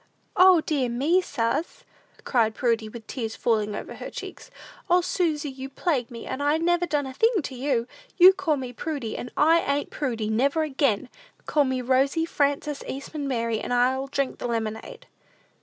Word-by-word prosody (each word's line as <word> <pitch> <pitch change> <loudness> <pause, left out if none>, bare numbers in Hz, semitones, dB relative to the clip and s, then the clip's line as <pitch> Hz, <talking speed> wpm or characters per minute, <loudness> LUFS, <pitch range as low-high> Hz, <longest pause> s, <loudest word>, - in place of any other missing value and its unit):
"O, 370 -2 +7
dear 280 -6 -1
me, 290 +10 +2
suz," 235 +1 -2 0.4
cried 225 -4 +1
Prudy, 230 -3 0
with 225 0 -10
tears 225 -4 -4
falling 215 -3 0
over - - -6
her - - -7
cheeks; - - -9 0.4
"O, 355 +1 +5
Susy, 315 -5 -1
you 265 0 -8
plague 275 -4 -1
me, 235 -2 -9
and 275 - -4
I 290 +2 +2
never 345 +1 +1
done 295 -3 0
a 265 - -7
thing 445 - +2
to 270 - -6
you! 250 -2 -1 0.3
You 370 +1 +9
called 330 -8 -1
me 250 -1 -6
Prudy, 275 -6 -4
and 245 - -5
I 325 +3 +5
ain't 285 -2 -1
Prudy, 230 -7 -2
never 275 +8 +2
again! 270 -6 0 0.4
Call 295 -2 +2
me 260 -1 -1
Rosy 270 +5 +2
Frances 285 -1 -1
Eastman 280 +2 -5
Mary, 230 -4 -1
and - - -5
I'll 255 +2 +2
drink 275 -1 -2
the - - -3
lemonade." 225 - -4
275 Hz, 175 wpm, -25 LUFS, 240-310 Hz, 0.4 s, You